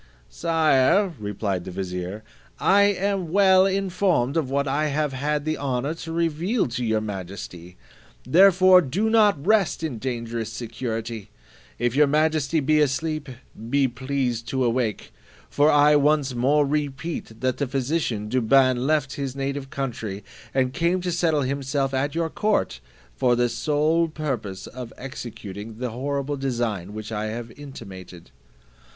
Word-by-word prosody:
"Sire," 165 +3 +2
replied 100 -3 -3
the - - -7
vizier, 90 +2 -5 0.4
"I 200 +1 +5
am 195 -3 0
well 190 0 +5
informed 185 -8 0
of 155 -6 0
what 140 +1 0
I 145 +3 +1
have 150 -1 -1
had 145 +2 -1
the 155 0 -1
honour 135 +1 -1
to 165 0 -8
reveal 170 - 0
to 120 +1 -3
your 110 -2 +1
majesty; 95 -3 -7 0.5
therefore 185 +5 +6
do 195 +10 -1
not 205 -10 +3
rest 205 -5 +2
in 135 -8 -3
dangerous 115 -2 -4
security: 115 -2 -5 0.5
if 120 +1 0
your 150 0 +5
majesty 155 +1 +1
be 155 +2 +3
asleep, 150 +1 0 0.4
be 140 +1 +3
pleased 125 -2 -2
to 130 -1 0
awake; 120 -2 -1 0.4
for 145 +1 +4
I 145 0 +5
once 145 -2 +2
more 140 +5 +3
repeat, 145 -4 -3
that 130 -1 0
the 140 - -1
physician 130 -5 -1
Douban 130 +2 +3
left 150 -2 0
his 135 -2 -4
native 135 0 -3
country, 115 -8 -4 0.3
and 130 -1 0
came 170 +4 +1
to 180 0 -2
settle 165 -4 +1
himself 135 0 -1
at 140 +3 -1
your 165 -1 -1
court, 210 - 0 0.4
for 125 - +2
the 120 0 +2
sole 155 +5 +1
purpose 135 -12 -4
of 125 -2 -8
executing 110 -5 -8
the 125 0 -3
horrible 140 +3 -3
design 115 -8 -2
which 110 0 -6
I 105 -1 -2
have 115 +1 -5
intimated." 95 - -11
135 Hz, 145 wpm, -24 LUFS, 120-155 Hz, 0.5 s, therefore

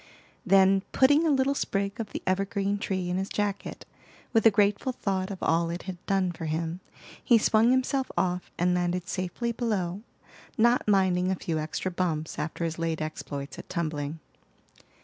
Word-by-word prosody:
Then 195 0 +5
putting 290 +5 +5
a - - +3
little 275 -1 +3
sprig 200 -5 -2
of 220 -2 -4
the - - -5
evergreen 195 +1 0
tree 185 -3 -2
in 180 - 0
his 195 +1 -2
jacket, 205 -1 -3 0.5
with 225 -2 +4
a - - +9
grateful 205 +3 +2
thought 190 -5 -2
of 195 - -5
all 165 +1 +2
it 170 +1 -4
had 185 -2 -7
done 195 -3 +1
for 165 -1 -7
him, 160 +2 -2 0.4
he 240 - +6
swung 220 +1 +4
himself 260 +1 +1
off 180 0 0
and 180 +1 +2
landed 180 0 -1
safely 185 +6 -2
below, 205 -6 -2 0.6
not 235 +1 +3
minding 185 -3 +3
a 190 - +1
few 165 -3 -3
extra 155 +4 -3
bumps 165 -3 -2
after 165 +2 -3
his 165 0 -4
late 165 -1 -1
exploits 145 -2 -5
at - - -11
tumbling. 155 -3 -3
190 Hz, 170 wpm, -27 LUFS, 170-210 Hz, 0.6 s, a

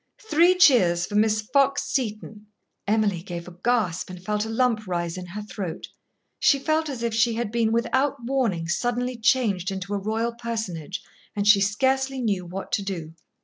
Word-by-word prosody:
Three 345 +4 +5
cheers 185 - +5
for - - -10
Miss 215 0 +2
Fox 275 +4 +2
Seton." 215 -4 -4 0.4
Emily 205 -4 +1
gave 175 -1 -7
a 180 - -11
gasp 210 -8 0
and 180 -1 -8
felt 210 +3 -2
a - - -6
lump 225 -2 +1
rise 170 -2 -2
in 180 -1 -7
her 210 +4 -6
throat. 195 -5 -6 0.5
She 280 - +4
felt 310 +2 0
as 250 -4 -5
if 230 -1 -1
she 230 +1 +2
had 230 -2 -2
been 230 -1 +1
without 260 +5 +1
warning 235 -11 0
suddenly 245 +7 -1
changed 220 -6 +1
into 195 0 -4
a 200 - 0
royal 225 +3 -1
personage, 220 -8 -5 0.3
and 205 0 -1
she 205 -1 +7
scarcely 265 +6 +1
knew 200 -7 -1
what 190 +2 -7
to - - +1
do. 170 -5 -5
215 Hz, 180 wpm, -24 LUFS, 190-245 Hz, 0.5 s, she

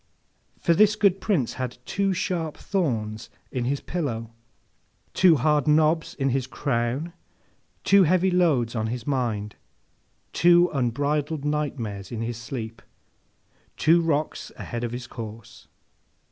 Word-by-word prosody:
For, 170 - +2
this 215 +4 +5
good 200 -3 +2
Prince 175 - 0
had 125 -1 -4
two 200 -1 0
sharp 175 -4 -2
thorns 115 - -2 0.2
in 125 -3 -2
his 140 +2 -1
pillow, 115 -10 -3 0.8
two 180 -3 +6
hard 150 +1 +2
knobs 155 +2 +2
in 135 -1 0
his 130 0 -1
crown, 130 +5 -2 0.7
two 200 -2 +6
heavy 185 +3 +3
loads 145 -10 +2
on 110 -1 -1
his 120 +1 -4
mind, 115 -7 -2 0.8
two 175 +1 +5
unbridled 145 +4 -1
nightmares 125 -10 -3
in 115 -2 -4
his 115 0 -4
sleep, 115 -1 -6 1.0
two 170 +2 +4
rocks 155 -2 -1
ahead 120 -1 -5
in 120 - -1
his 120 +1 -6
course. 115 -1 -10
140 Hz, 130 wpm, -25 LUFS, 115-165 Hz, 1.0 s, two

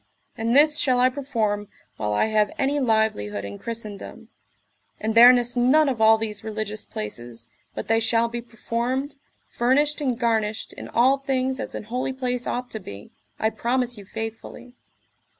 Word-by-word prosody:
And 230 +2 0
this 300 +1 +5
shall 255 -2 +2
I 255 +1 +5
perform 225 -7 -2 0.3
while 105 -1 -2
I 105 - +2
have 215 -1 +2
any 280 +1 +1
livelihood 220 - 0
in 100 0 -8
Christendom; 220 -3 -7 0.7
and 220 +1 -1
there 240 +2 +10
nis 245 -1 +1
none 265 +6 +4
of 250 -5 -1
all 220 0 +7
these 215 -2 -4
religious 215 -1 -4
places, 115 +2 -6 0.3
but - - -5
they 225 0 +3
shall 230 +1 +2
be 235 0 -5
performed, 240 +4 -3 0.3
furnished 290 +5 +1
and 255 -5 0
garnished 220 -2 -1
in - - -8
all 260 +4 +3
things 265 -1 -1
as - - -5
an - - -5
holy 250 +4 -3
place 250 -2 -2
ought 250 0 -3
to 220 - -4
be, 100 - -10 0.3
I 220 - 0
promise 245 +1 0
you 205 -3 -11
faithfully. 225 +3 -7
230 Hz, 170 wpm, -24 LUFS, 215-255 Hz, 0.7 s, there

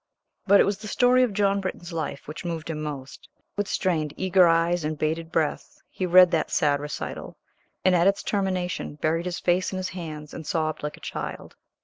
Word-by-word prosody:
But 200 +1 +7
it - - +7
was 200 0 -1
the 215 - -8
story 250 +3 +4
of 250 -3 +2
John 200 0 +1
Britton's 180 -2 -5
life 155 -4 -4
which 150 - -7
moved 165 -2 -4
him 155 -1 -4
most. 140 -3 -7 0.3
With 205 -1 -1
strained, 160 -7 -1
eager 185 -1 +4
eyes 165 +1 +2
and 155 0 -2
bated 160 +2 -2
breath 160 -3 -2
he 185 - -2
read 180 0 +7
that 160 - 0
sad 145 -2 +2
recital, 150 0 -6 0.5
and 185 - +5
at 175 +1 +4
its 200 0 +2
termination, 185 -6 -2
buried 165 +3 -1
his 175 - -3
face 180 0 +1
in 190 - -4
his 185 0 -3
hands 155 -5 -7
and 160 - -8
sobbed 155 -2 -1
like 150 0 -5
a - - -18
child. - - -6
170 Hz, 205 wpm, -25 LUFS, 155-185 Hz, 0.5 s, But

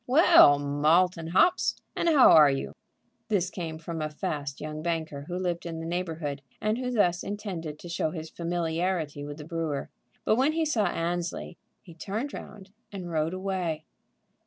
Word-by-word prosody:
"Well, 280 - +7
Malt 150 +6 +3
and 165 -1 -6
hops, 345 - +3 0.2
and 340 - +1
how 290 -5 +7
are 150 -2 +8
you?" 135 0 -2 0.5
This 190 -4 0
came 165 -3 -5
from 165 0 -5
a 155 - -2
fast 145 -2 -4
young 155 0 -5
banker 160 -4 -3
who 180 - -3
lived 175 -2 -2
in 165 -1 -5
the 165 - -5
neighborhood, 165 -5 -3 0.2
and 215 +3 0
who 250 -1 -2
thus 180 -8 +2
intended 185 -7 -5
to 175 - -11
show 170 -2 -1
his 160 -1 -6
familiarity 170 -2 -2
with 145 0 -7
the 150 - -9
brewer; 160 -3 -3 0.3
but 215 - +3
when 275 +5 +3
he 325 0 +1
saw 225 -10 +1
Annesley, 175 0 -3 0.3
he 170 - -13
turned 210 - -4
round 195 -2 -10 0.2
and 185 -4 -6
rode 160 +2 0
away. 185 -5 -3
170 Hz, 175 wpm, -27 LUFS, 155-190 Hz, 0.5 s, are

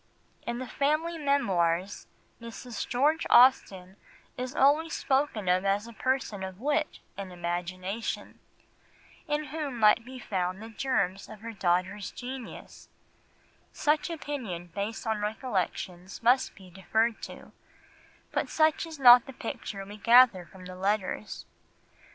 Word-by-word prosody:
In 235 0 -2
the 255 - -4
family 310 +6 0
memoirs, 195 - 0 0.3
Mrs. 235 +1 -6
George 290 +6 +1
Austen 195 -7 +4 0.4
is 255 +2 -5
always 300 +4 +3
spoken 265 -7 0
of 180 +1 +3
as 200 +2 +1
a 235 - -10
person 255 -5 -1
of 190 0 -6
wit 295 +4 0 0.2
and 195 -2 -6
imagination, 180 +4 -4 0.9
in 295 0 0
whom 295 -6 -3
might 215 +1 +5
be 255 +2 -10
found 185 -5 -2
the 225 +1 -9
germs 195 -6 -1
of 215 -1 -11
her 230 0 -7
daughter's 185 +1 0
genius; 255 -1 -9 0.8
such 310 +4 +1
opinion 240 - -5
based 205 +5 -4
on 220 -2 -1
recollections 195 -4 -3
must 250 +3 +3
be 185 -3 -15
deferred 220 +5 0
to, - - -9 0.8
but - - -1
such 315 +1 +2
is 320 -1 -9
not 245 -2 +8
the 270 - -8
picture 200 -4 -6
we 205 +2 -10
gather 230 -5 +6
from 185 +2 -14
the 185 0 -8
letters. 200 +2 -2
220 Hz, 135 wpm, -28 LUFS, 190-265 Hz, 0.9 s, not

